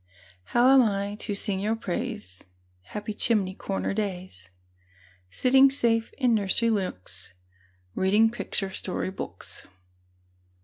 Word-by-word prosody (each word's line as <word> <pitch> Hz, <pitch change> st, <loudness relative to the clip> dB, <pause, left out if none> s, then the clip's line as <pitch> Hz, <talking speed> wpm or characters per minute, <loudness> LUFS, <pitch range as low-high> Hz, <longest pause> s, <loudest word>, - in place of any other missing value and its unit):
How 250 Hz, +3 st, +4 dB
am 270 Hz, -, +7 dB
I 200 Hz, -3 st, 0 dB
to 205 Hz, -, -2 dB
sing 200 Hz, -1 st, 0 dB
your 215 Hz, +3 st, 0 dB
praise, 210 Hz, -, -5 dB, 0.4 s
Happy 210 Hz, -, -6 dB
chimney 205 Hz, -4 st, +2 dB
corner 195 Hz, 0 st, -3 dB
days, 185 Hz, -, -5 dB, 0.8 s
Sitting 265 Hz, -, +5 dB
safe 230 Hz, -4 st, +1 dB
in 250 Hz, -3 st, +1 dB
nursery 220 Hz, +2 st, +2 dB
nooks, 95 Hz, -, -4 dB, 0.6 s
Reading 210 Hz, +4 st, +3 dB
picture 195 Hz, -4 st, -2 dB
story 190 Hz, 0 st, -3 dB
books? -, -, -9 dB
205 Hz, 115 wpm, -26 LUFS, 190-230 Hz, 0.8 s, am